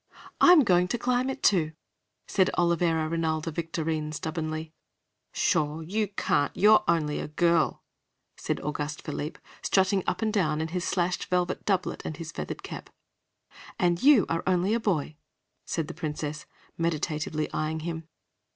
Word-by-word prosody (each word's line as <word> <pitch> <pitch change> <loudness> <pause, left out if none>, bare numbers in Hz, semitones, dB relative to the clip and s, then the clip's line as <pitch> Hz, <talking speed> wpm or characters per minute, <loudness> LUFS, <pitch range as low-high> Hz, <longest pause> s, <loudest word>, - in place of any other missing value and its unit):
"I'm 355 -3 +8
going 180 -4 +3
to 240 - -1
climb 250 +2 0
it, 265 - -5
too," 160 -6 +3 0.5
said 190 -2 +3
Olivera 170 -2 +2
Rinalda 160 0 -1
Victorine 160 -1 -2
stubbornly. 155 0 -4 0.6
"Pshaw, 150 +1 +1
you 205 +6 -1
can't! 145 -7 0
You're 215 +2 +6
only 150 -3 +1
a - - -4
girl," 170 +2 +1 0.5
said - - -3
Auguste 150 0 -4
Philippe, 150 0 -5 0.2
strutting 190 0 +2
up - - -1
and 215 -1 0
down 155 -7 +1
in 160 0 -2
his 180 +1 -2
slashed 180 -1 0
velvet 180 0 -1
doublet 195 -3 0
and 155 - -5
his 165 0 -6
feathered - - -6
cap. - - -8 0.9
"And 175 -2 +1
you 275 -7 +6
are 165 - -1
only 185 +3 +2
a 230 - +2
boy," 155 -8 -1 0.5
said 160 -3 -2
the - - -6
Princess, 150 -2 -4 0.3
meditatively 155 -1 -1
eying 155 +1 -2
him. 165 -1 -5
165 Hz, 150 wpm, -27 LUFS, 155-185 Hz, 0.9 s, I'm